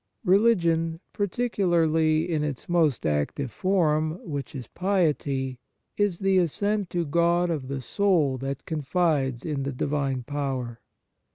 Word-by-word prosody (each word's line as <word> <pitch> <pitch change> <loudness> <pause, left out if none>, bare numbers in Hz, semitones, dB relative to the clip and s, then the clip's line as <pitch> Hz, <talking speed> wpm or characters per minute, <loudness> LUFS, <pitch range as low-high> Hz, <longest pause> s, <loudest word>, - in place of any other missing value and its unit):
Religion, 170 -5 +3
particularly 170 -8 +1
in 160 -4 0
its 145 -4 -4
most 165 -7 +2
active 75 - -1
form, 155 - +1
which 145 -3 -5
is 130 -3 -5
piety, 145 -9 0 0.4
is 205 -4 +1
the 195 0 +3
ascent 200 +3 0
to 175 -1 -1
God 170 +3 +2
of 145 -5 -3
the 135 0 -4
soul 165 -3 +2
that 135 +1 -4
confides 150 -4 0
in 150 -4 -2
the 135 +1 -2
divine 135 -1 -1
power. 130 -4 -3
155 Hz, 125 wpm, -26 LUFS, 135-180 Hz, 0.4 s, Religion